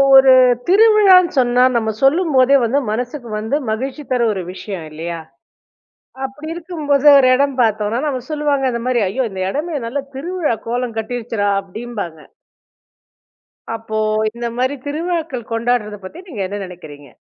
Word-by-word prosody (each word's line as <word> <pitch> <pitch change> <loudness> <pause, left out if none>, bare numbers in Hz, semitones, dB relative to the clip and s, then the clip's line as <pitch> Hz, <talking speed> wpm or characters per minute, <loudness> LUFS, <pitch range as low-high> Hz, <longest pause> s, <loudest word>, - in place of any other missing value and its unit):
ஒரு 265 0 +8 0.4
திருவிழான்னு 395 -2 +6
சொன்னா 245 -1 +3
நம்ம 220 -2 +1
சொல்லும்போதே 275 -2 +4
வந்து 240 +5 +1
மனசுக்கு 245 +2 -4
வந்து 220 +6 -2
மகிழ்ச்சி 265 +7 -3
தர 250 -1 +1
ஒரு 190 - -4
விஷயம் 190 -4 -7
இல்லயா! 165 +2 -5 1.0
அப்பிடி 295 +4 -6
இருக்கும்போது, 310 -5 -1
ஒரு 265 -2 +5
இடம் 280 +1 +1
பார்த்தோன்னா, 220 0 0
அவுங்க 255 -2 -5
சொல்லுவாங்க 290 -3 0
இந்தமாரி 240 0 0
ஐயோ! 255 +6 -1
இந்த 190 -1 -5
இடமே 305 - -3
நல்ல 265 +5 -3 0.2
திருவிழா 325 -2 -2
கோலம் 240 0 -2
கட்டிடுச்சுடா 225 -2 -2
அப்பிடிம்பாங்க. 200 -4 -7 1.6
அப்போ 220 -1 -5 0.3
இந்தமாரி 240 +3 -2
திருவிழாக்கள் 315 -5 -3
கொண்டாட்றதப் 230 -3 -1
பத்தி 250 - -10
நீங்க 235 - -6
என்ன 200 +2 -5
நினைக்கிறீங்க? 155 -6 -12
245 Hz, 130 wpm, -18 LUFS, 220-285 Hz, 1.6 s, ஒரு